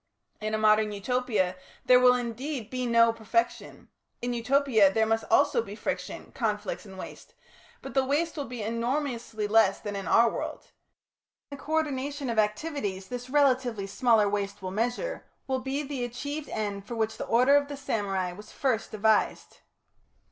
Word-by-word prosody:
In 215 Hz, 0 st, -2 dB
a -, -, 0 dB
modern 215 Hz, 0 st, +4 dB
Utopia 205 Hz, -3 st, 0 dB, 0.3 s
there 250 Hz, 0 st, +7 dB
will, 250 Hz, 0 st, +6 dB
indeed, 245 Hz, 0 st, -4 dB
be 255 Hz, -1 st, -2 dB
no 230 Hz, -1 st, +5 dB
perfection; 230 Hz, +1 st, -2 dB, 0.3 s
in 245 Hz, 0 st, -2 dB
Utopia 235 Hz, -4 st, +3 dB
there 220 Hz, +2 st, +2 dB
must 225 Hz, 0 st, +1 dB
also 470 Hz, -, +4 dB
be -, -, -8 dB
friction, -, -, -5 dB
conflicts 210 Hz, -2 st, -2 dB
and 190 Hz, -1 st, -11 dB
waste, -, -, -10 dB, 0.5 s
but -, -, -7 dB
the 270 Hz, -, +3 dB
waste 295 Hz, +5 st, 0 dB
will 290 Hz, -3 st, -3 dB
be 240 Hz, -2 st, -6 dB
enormously 230 Hz, -1 st, -2 dB
less 210 Hz, -2 st, +4 dB
than 205 Hz, -1 st, -5 dB
in 195 Hz, -1 st, -5 dB
our 235 Hz, -, +5 dB
world. -, -, -5 dB, 0.8 s
And 280 Hz, -, -7 dB
the -, -, -13 dB
co 310 Hz, -, -5 dB
ordination 285 Hz, -3 st, -1 dB
of 225 Hz, -, 0 dB
activities 210 Hz, -4 st, -2 dB
this 245 Hz, 0 st, -6 dB
relatively 255 Hz, -7 st, +2 dB
smaller 220 Hz, +1 st, +3 dB
waste 200 Hz, 0 st, -3 dB
will 185 Hz, -, -3 dB
measure, 245 Hz, -, -2 dB, 0.2 s
will 260 Hz, -1 st, -1 dB
be 270 Hz, +3 st, -3 dB
the 270 Hz, -3 st, -4 dB
achieved 285 Hz, +5 st, -5 dB
end 205 Hz, -2 st, -4 dB
for 235 Hz, -, -5 dB
which 220 Hz, -1 st, -1 dB
the -, -, -5 dB
order 250 Hz, +5 st, +5 dB
of 285 Hz, 0 st, +3 dB
the 285 Hz, -1 st, -6 dB
samurai 195 Hz, -8 st, -2 dB
was 210 Hz, +4 st, -12 dB
first 255 Hz, -5 st, -1 dB
devised. 215 Hz, 0 st, +1 dB
230 Hz, 170 wpm, -28 LUFS, 210-265 Hz, 0.8 s, there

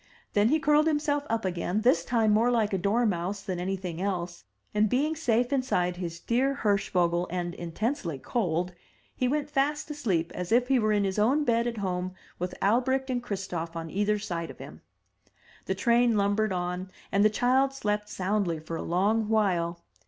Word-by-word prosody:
Then 205 Hz, +2 st, +4 dB
he 310 Hz, +4 st, +3 dB
curled 300 Hz, +1 st, +3 dB
himself 295 Hz, -2 st, +1 dB
up 225 Hz, -2 st, -1 dB
again, 180 Hz, +3 st, -1 dB
this 190 Hz, -8 st, +3 dB
time 225 Hz, +1 st, +2 dB
more 225 Hz, +3 st, +4 dB
like 225 Hz, -4 st, +1 dB
a -, -, +2 dB
dormouse 200 Hz, -2 st, 0 dB
than 185 Hz, -2 st, -3 dB
anything 180 Hz, -2 st, -3 dB
else; 175 Hz, -, -3 dB, 0.3 s
and, 210 Hz, 0 st, +3 dB
being 295 Hz, +7 st, +1 dB
safe 245 Hz, -3 st, +1 dB
inside 180 Hz, -10 st, 0 dB
his 170 Hz, -2 st, -5 dB
dear 265 Hz, +7 st, +1 dB
Hirschvogel 180 Hz, -4 st, +1 dB
and 175 Hz, 0 st, -3 dB
intensely 175 Hz, -, -3 dB
cold, 180 Hz, -, -1 dB, 0.4 s
he 255 Hz, -, 0 dB
went 290 Hz, +2 st, 0 dB
fast 295 Hz, +2 st, 0 dB
asleep 195 Hz, -, -1 dB
as 180 Hz, +1 st, -5 dB
if 245 Hz, +2 st, +3 dB
he 265 Hz, -2 st, +4 dB
were 215 Hz, -1 st, +2 dB
in 205 Hz, -1 st, +2 dB
his 195 Hz, +1 st, -1 dB
own 265 Hz, +8 st, +3 dB
bed 235 Hz, -3 st, +2 dB
at 235 Hz, -1 st, -3 dB
home 185 Hz, -2 st, -2 dB, 0.2 s
with 180 Hz, +1 st, -3 dB
Albrecht 260 Hz, +5 st, +2 dB
and 245 Hz, -1 st, -1 dB
Christof 185 Hz, -7 st, -4 dB
on 165 Hz, -1 st, -5 dB
either 210 Hz, +1 st, +1 dB
side 170 Hz, -5 st, -4 dB
of -, -, -10 dB
him. -, -, -11 dB, 0.8 s
The -, -, -1 dB
train 235 Hz, -2 st, +3 dB
lumbered 205 Hz, +1 st, +1 dB
on, 180 Hz, +1 st, -3 dB, 0.2 s
and 200 Hz, +1 st, +3 dB
the 215 Hz, -, +6 dB
child 255 Hz, +5 st, +2 dB
slept 210 Hz, -5 st, -2 dB
soundly 185 Hz, -3 st, -1 dB
for 160 Hz, +1 st, -6 dB
a -, -, -3 dB
long 210 Hz, +5 st, +1 dB
while. 175 Hz, -6 st, +1 dB
210 Hz, 180 wpm, -28 LUFS, 180-245 Hz, 0.8 s, the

